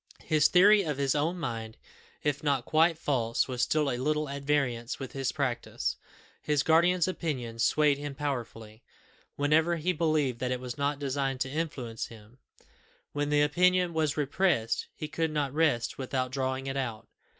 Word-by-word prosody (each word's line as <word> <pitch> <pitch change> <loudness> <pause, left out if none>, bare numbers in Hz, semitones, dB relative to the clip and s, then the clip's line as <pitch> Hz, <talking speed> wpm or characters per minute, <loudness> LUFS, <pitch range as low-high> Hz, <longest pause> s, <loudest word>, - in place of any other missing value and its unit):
His 155 -1 +4
theory 200 +3 +6
of 150 -7 -3
his 140 -2 +1
own 155 +5 0
mind, 115 -8 -5 0.5
if 145 -1 0
not 140 -4 +1
quite 160 +1 +3
false, 120 -7 0
was 125 -2 -3
still 150 +4 +2
a 120 - -2
little 150 +3 0
at 140 0 -5
variance 135 -4 0
with 135 -2 -7
his 135 -2 -2
practice. 130 -5 -2 0.5
His 150 -2 +1
guardian's 170 +3 +4
opinion 130 -11 -4
swayed 145 +3 +3
him 145 -1 -5
powerfully, 115 -6 -5 0.5
whenever 155 +4 +2
he 170 +3 0
believed 155 -7 0
that 125 - -1
it 125 - -1
was 125 -1 -6
not 140 0 -1
designed 135 -1 -2
to 130 - -1
influence 135 -8 -4
him; 115 +2 -15 0.7
when 145 0 -2
the 145 0 +3
opinion 180 +3 +3
was 155 -2 0
repressed, 145 -6 +1
he 155 - -5
could 160 +1 -1
not 145 -3 -2
rest 150 -8 +1
without 130 -1 -2
drawing 130 0 -2
it 135 0 -3
out. 115 -5 -4
145 Hz, 170 wpm, -29 LUFS, 130-155 Hz, 0.7 s, theory